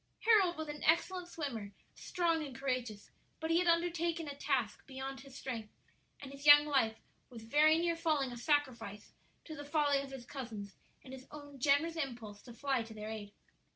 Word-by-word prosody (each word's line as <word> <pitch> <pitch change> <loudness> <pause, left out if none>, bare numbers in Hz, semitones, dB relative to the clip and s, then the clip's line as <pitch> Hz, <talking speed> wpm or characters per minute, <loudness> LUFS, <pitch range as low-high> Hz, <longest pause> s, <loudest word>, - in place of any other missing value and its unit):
Harold 405 -7 +4
was 315 -1 -4
an 295 0 -6
excellent 350 +2 +2
swimmer, 235 -12 -5 0.2
strong 335 -3 0
and 275 -3 -7
courageous; 245 -5 -3 0.3
but 320 +1 -2
he 335 - +4
had 360 - +1
undertaken 335 -1 +1
a 285 - -4
task 260 -7 -1
beyond 270 0 -6
his 270 -1 -13
strength, 230 -5 -5 0.5
and 275 -1 -9
his 275 0 -11
young 290 0 +10
life 265 -7 +2 0.3
was 230 -3 -10
very 305 +7 +5
near 340 0 +1
falling 310 -6 0
a - - -6
sacrifice 240 -6 -1 0.3
to 315 - -7
the 290 - -7
folly 290 -1 +2
of 275 - -8
his 265 -3 -8
cousins 225 -7 -7 0.3
and 260 - -11
his 265 0 -10
own 290 -2 -11
generous 290 +5 +2
impulse 235 -8 -5
to 245 - -12
fly 265 +1 0
to 225 -1 -9
their 215 0 -6
aid. 210 -2 -7
280 Hz, 190 wpm, -34 LUFS, 240-315 Hz, 0.5 s, young